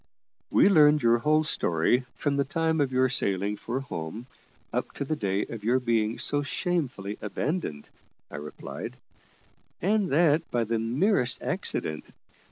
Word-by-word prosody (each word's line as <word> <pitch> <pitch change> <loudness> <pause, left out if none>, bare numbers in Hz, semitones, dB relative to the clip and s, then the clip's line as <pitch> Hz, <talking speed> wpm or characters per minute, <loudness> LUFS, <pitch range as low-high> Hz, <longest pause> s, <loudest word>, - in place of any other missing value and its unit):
"We - - +5
learned 150 -6 +5
your 115 0 +4
whole 155 +4 +3
story, 120 - +1
from 145 -1 -1
the 140 - +3
time 160 +2 0
of 135 -2 +1
your 130 0 +3
sailing 100 -5 0
for 120 +5 -4
home 105 -2 -6 0.5
up - - -2
to 140 - -4
the 155 - -1
day 100 -6 -1
of 110 -3 -8
your 120 +4 +3
being 115 -3 0
so 145 0 +1
shamefully 140 - -2
abandoned," 105 - -3 0.4
I - - -6
replied, 75 +1 -7 0.8
"and 205 0 +1
that 160 +1 +3
by 120 -1 0
the 115 0 -1
merest 125 - +1
accident. 75 -1 -2
130 Hz, 150 wpm, -27 LUFS, 105-155 Hz, 0.8 s, We